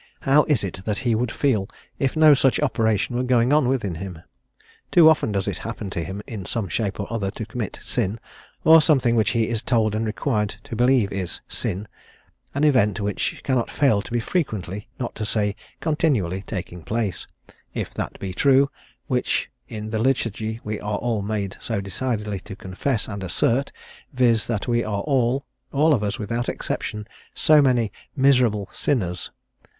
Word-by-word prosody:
How 145 +2 +4
is 140 -9 +1
it 95 -1 -5
that 105 -2 -1
he 120 - +3
would 115 +1 0
feel, 110 -9 +1 0.3
if 135 +3 0
no 155 -1 +8
such 135 -1 +3
operation 110 -5 +1
were 125 - +1
going 125 +1 +3
on 150 -4 +4
within 115 -9 0
him? 85 -1 -7 0.7
Too 170 -2 +7
often 160 -8 +4
does 100 -1 -1
it - - -2
happen 110 -3 -5
to 85 - -2
him 95 +4 -6
in 105 -5 -6
some 110 +2 -2
shape 105 -4 -2
or 100 - -1
other, 100 -4 -1
to 110 +2 -6
commit 110 -2 -5
sin; 105 +5 -1 0.4
or 160 0 +8
something 135 -7 +3
which 110 -2 +3
he 115 -2 +1
is 115 -2 -1
told 110 -4 +1
and 110 +1 0
required 105 -2 -1
to 115 - -6
believe 120 -3 +3
is 95 -3 -4
sin: 100 +4 -3 0.7
an 140 - +1
event 115 -10 +3
which 100 -1 -2
cannot 130 -4 0
fail 135 -9 +3
to - - -11
be 120 - +1
frequently, 105 - -2
not 120 - -3
to 110 - -5
say 105 -1 0 0.3
continually, 130 - +1
taking 90 -4 -5
place, 110 0 -2 0.5
if - - -3
that - - -5
be 95 -2 -4
true, 140 +6 +4 0.3
which 125 -4 0 0.2
in 110 -1 -6
the 110 - -1
Liturgy 110 -3 0
we 105 0 -3
are 105 0 -2
all 115 -2 -1
made 100 -2 -3
so 115 -3 -2
decidedly 105 0 -2
to 100 +1 -9
confess 100 +6 -2
and 100 -2 -5
assert, 115 - +1 0.4
viz., 120 -4 +3
that 115 -1 -2
we 120 -1 +2
are 100 -2 -2
all 130 +1 +1 0.3
all 150 +3 +4
of 120 - +1
us 105 -1 -1
without 115 +3 -2
exception 105 0 -4 0.3
so 155 -1 +5
many 125 -6 +2 0.3
_'miserable 125 -7 +4
sinners.' 90 -10 -1
110 Hz, 180 wpm, -23 LUFS, 100-130 Hz, 0.7 s, no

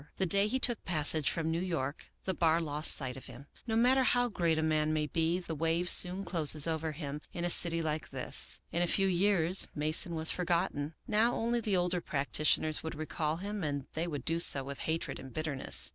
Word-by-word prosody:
The 190 - 0
day 200 +3 +4
he 255 - -1
took 240 -3 0
passage 155 -2 +1
from 160 -1 -2
New 165 +1 -2
York, 160 -6 -4 0.2
the 190 - -2
bar 165 -2 +1
lost 150 -1 +3
sight 130 -3 +2
of 135 - -10
him. 140 - -12 0.2
No 220 - -2
matter 250 +3 +3
how 245 -1 +1
great 170 -6 -1
a 160 - -1
man 155 -1 0
may 155 -1 -1
be, 165 +3 -1
the 175 -3 -7
wave 165 +3 +1
soon 185 +2 +5
closes 155 -5 +3
over 160 -1 -3
him 145 -1 -7
in 175 0 -4
a 175 - -1
city 165 -1 +3
Hke 155 0 -4
this. - - +1
In 170 - -1
a 175 - +1
few 195 +3 +1
years 185 -1 +2
Mason 155 +3 +2
was 160 0 0
forgotten. 170 -4 -2
Now 225 +3 +1
only 235 +1 -1
the 210 -4 -1
older 180 0 -1
practitioners 155 +1 0
would 160 - -7
recall 155 0 -4
him, 200 +1 -6
and 145 -3 -4
they 165 +2 -3
would 145 -6 -6
do 165 +1 -1
so 140 -5 +5
with 140 +1 -8
hatred 165 +1 -3
and 130 0 -11
bitterness. 155 -1 +2
165 Hz, 215 wpm, -30 LUFS, 155-180 Hz, 0.2 s, soon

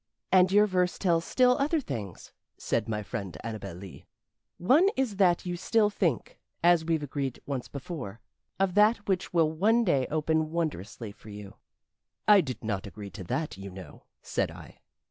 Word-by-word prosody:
"And 185 0 +5
your 205 +1 +6
verse 180 -3 0
tells 170 -3 +1
still 250 -1 +4
other 305 +4 +2
things," 110 - -7 0.2
said 115 -1 -1
my 105 -1 -2
friend 100 -8 -5
Annabel 105 -5 -6
Lee. 95 +1 -11 0.5
"One 285 - +4
is 250 -7 -1
that 180 -3 +3
you 175 -1 -2
still 210 +4 +2
think, 170 - -1 0.2
as 175 -1 +5
we've 160 -2 0
agreed 135 -2 -3
once 135 -3 -4
before, 135 - -7 0.4
of 195 -2 +2
that 210 +1 +3
which 185 -2 -1
will 165 -3 +3
one 220 +9 +3
day 140 - +2
open 155 0 0
wondrously 125 - -3
for 105 - -15
you." 100 -1 -10 0.7
"I 205 -2 +8
did 130 -7 -6
not 105 -3 -3
agree 100 +2 -9
to 95 +2 -8
that, 155 - -3
you 100 0 -7
know," 90 -5 -12 0.2
said - - -1
I. - - -12
160 Hz, 170 wpm, -28 LUFS, -, 0.7 s, I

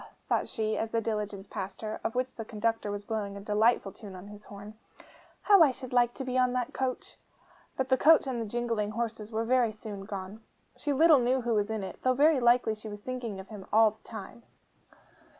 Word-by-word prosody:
thought - - +1
she, 220 -2 -2
as 225 - -2
the 230 - 0
diligence 210 -3 -3
passed 195 +1 -6
her, 215 0 -4
of 225 - -2
which 255 +1 -1
the 225 - -5
conductor 225 0 -2
was 205 0 -5
blowing 205 -3 -3
a - - -6
delightful 210 +1 +2
tune 195 -1 -11
on 185 +2 -10
his 210 0 -12
horn, 205 +1 -10 0.7
'how 400 -4 +6
I 310 - +8
should 255 -1 -7
like 240 -1 +3
to 270 - -4
be 255 0 0
on 250 -1 +3
that 250 -1 -2
coach!' 260 -1 -3 0.6
But 265 0 -1
the 260 - +4
coach 315 +3 +6
and 255 -3 -2
the 225 - -4
jingling 230 -2 -1
horses 225 -1 -4
were 225 +1 -1
very 245 -1 +3
soon 210 -2 -8
gone. 195 +1 -7 0.3
She 290 - -3
little 310 +1 +6
knew 250 +2 +1
who 240 -1 0
was 210 -1 +1
in 220 -2 -3
it, 190 - -7
though 255 0 +2
very 295 +1 +4
likely 240 -2 +4
she 215 0 -9
was 205 0 -8
thinking 240 -5 -5
of 190 - -10
him 205 -4 -9
all 220 0 +6
the 215 - -24
time. 220 +1 -9
225 Hz, 220 wpm, -29 LUFS, 210-250 Hz, 0.7 s, I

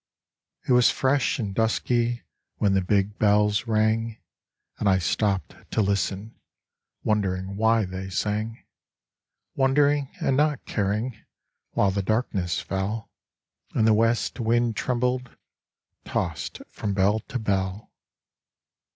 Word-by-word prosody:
It - - +1
was 125 -1 +6
fresh 135 +1 +1
and 100 -4 -3
dusky 120 +1 0 0.3
When 100 -2 +2
the 95 - +3
big 100 +2 0
bells 105 +1 +3
rang, 110 +1 +1 0.6
And 100 - +2
I 95 - +4
stopped 95 +2 0 0.2
to - - +3
listen, 100 +2 -2 0.6
Wondering 95 -3 0
why 110 +1 +3
they 95 +1 -6
sang, 105 +4 -2 0.9
Wondering 140 +1 +2
and 135 - +1
not 150 -1 +1
caring, 110 +3 -2 0.5
While 100 - +3
the 100 +1 -1
darkness 100 -4 0
fell, 100 +3 -3 0.6
And 110 - +3
the 110 - +5
west 115 +4 +1
wind 120 0 +1
trembled 125 +1 -1 0.7
Tossed 85 -3 -3
from 100 -2 -3
bell 100 +3 +3
to 125 - -6
bell. 100 -2 -2
110 Hz, 115 wpm, -25 LUFS, 100-120 Hz, 0.9 s, was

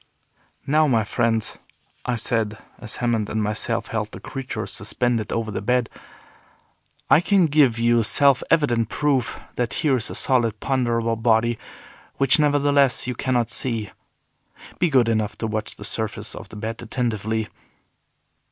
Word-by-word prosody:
"Now 155 +2 +3
my 115 -5 +2
friends," 115 0 -1 0.5
I 125 - +1
said, 110 -2 0 0.2
as 110 -2 -4
Hammond 115 -4 -1
and 110 0 -1
myself 110 +2 -2
held 110 -1 -3
the - - -9
creature 130 -5 -5
suspended 115 +2 -2
over 115 -1 -2
the 100 - -4
bed, 125 +2 0 1.2
"I 155 - +5
can 190 0 +3
give 145 -6 +3
you 115 0 +3
self 135 +4 +5
evident 120 -9 +2
proof 135 -6 0 0.2
that 120 -2 -1
here 135 -4 +3
is 115 - -2
a - - -6
solid, 115 -5 +1
ponderable 120 -4 0
body, 115 0 +2 0.6
which, 135 +2 +4
nevertheless, 145 -2 +3
you 125 - -2
cannot 120 -2 -1
see. 115 -5 -1 0.9
Be 175 - +2
good 130 -5 +3
enough 110 -2 -1
to - - -3
watch 110 0 -3
the - - -11
surface 110 0 -2
of - - -10
the - - -12
bed 110 +2 -5
attentively." 110 -2 -2
115 Hz, 150 wpm, -22 LUFS, 110-130 Hz, 1.2 s, I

